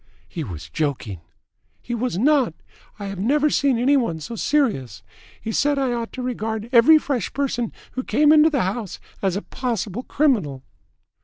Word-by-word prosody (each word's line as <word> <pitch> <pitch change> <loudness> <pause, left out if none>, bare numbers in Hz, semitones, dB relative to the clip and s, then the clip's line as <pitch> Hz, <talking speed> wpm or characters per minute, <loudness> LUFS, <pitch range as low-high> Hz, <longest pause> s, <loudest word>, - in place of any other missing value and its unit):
"He 165 - -5
was 85 - -7
joking." 130 - -3 0.6
"He 240 - -6
was 235 -4 -1
not. 260 - +3 0.4
I 205 - -6
have 195 -2 -5
never 290 +8 +2
seen 275 -4 +2
any 260 +5 +3
one 200 - 0
so 195 +10 -7
serious. 225 - 0 0.4
He 220 - -4
said 290 +5 +2
that 270 -2 0
I - - 0
ought 235 -1 -3
to 255 - -5
regard 225 -2 -3
every 260 +6 +7
fresh 280 -5 -2
person 255 -4 -1 0.2
who 255 - -4
came 300 +3 +3
into 310 +1 +6
the 280 -5 +1
house 200 +1 -3 0.2
as 190 -2 0
a 200 - -3
possible 235 -4 -3
criminal." 215 - 0
235 Hz, 175 wpm, -22 LUFS, 195-275 Hz, 0.6 s, every